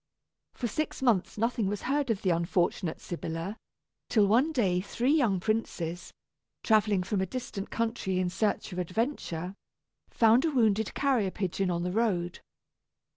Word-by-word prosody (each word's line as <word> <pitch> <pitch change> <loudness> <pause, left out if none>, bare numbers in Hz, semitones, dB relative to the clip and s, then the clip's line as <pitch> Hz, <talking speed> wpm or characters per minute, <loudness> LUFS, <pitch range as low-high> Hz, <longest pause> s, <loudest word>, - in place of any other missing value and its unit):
For 245 - -2
six 305 +4 -3
months 220 -8 +2
nothing 230 -1 0
was 205 +1 -3
heard 280 0 0
of 215 -4 -1
the 185 - +3
unfortunate 170 0 0
Sybilla, 165 +3 -5 0.5
till 215 -3 +4
one 245 +10 +3
day 190 - +1
three 240 +7 0
young 240 - +3
princes, 175 -5 -2 0.5
travelling 210 -4 +3
from 195 +1 -1
a 190 - -1
distant 205 -2 -5
country 225 -5 -1
in 180 -1 0
search 205 -1 -1
of 180 - -4
adventure, 180 - -2 0.6
found 230 +2 +4
a 330 - +2
wounded 220 -6 +2
carrier 255 -8 +2
pigeon 190 -1 -2
on 170 -1 -1
the 180 - -1
road. 180 -5 0
205 Hz, 150 wpm, -29 LUFS, 180-235 Hz, 0.6 s, till